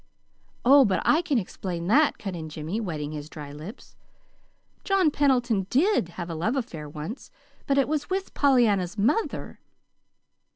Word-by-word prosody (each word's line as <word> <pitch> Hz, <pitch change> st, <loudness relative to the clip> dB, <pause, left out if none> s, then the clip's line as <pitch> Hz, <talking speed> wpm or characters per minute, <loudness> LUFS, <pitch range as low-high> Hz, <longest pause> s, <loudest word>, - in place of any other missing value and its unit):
"Oh, 275 Hz, +2 st, +8 dB
but 200 Hz, -6 st, +1 dB
I 315 Hz, -, +4 dB
can 300 Hz, -6 st, 0 dB
explain 180 Hz, -4 st, -4 dB
that," 285 Hz, -, +3 dB
cut 195 Hz, -3 st, -5 dB
in 160 Hz, -2 st, -6 dB
Jimmy, 155 Hz, +7 st, -4 dB
wetting 155 Hz, -7 st, -4 dB
his 150 Hz, 0 st, -7 dB
dry 150 Hz, -3 st, -9 dB
lips. 155 Hz, -, -11 dB, 0.9 s
"John 385 Hz, -6 st, +3 dB
Pendleton 245 Hz, -9 st, +1 dB
DID 310 Hz, -, +2 dB
have 175 Hz, -2 st, -4 dB
a 170 Hz, -, -5 dB
love 175 Hz, -, -1 dB
affair 165 Hz, -, -5 dB
once, 155 Hz, -, -7 dB, 0.4 s
but 275 Hz, -, +2 dB
it 275 Hz, -, +3 dB
was 300 Hz, 0 st, -2 dB
with 385 Hz, +1 st, -3 dB
Pollyanna's 220 Hz, -9 st, +2 dB
mother." 240 Hz, -, -1 dB
210 Hz, 155 wpm, -26 LUFS, 165-280 Hz, 0.9 s, Oh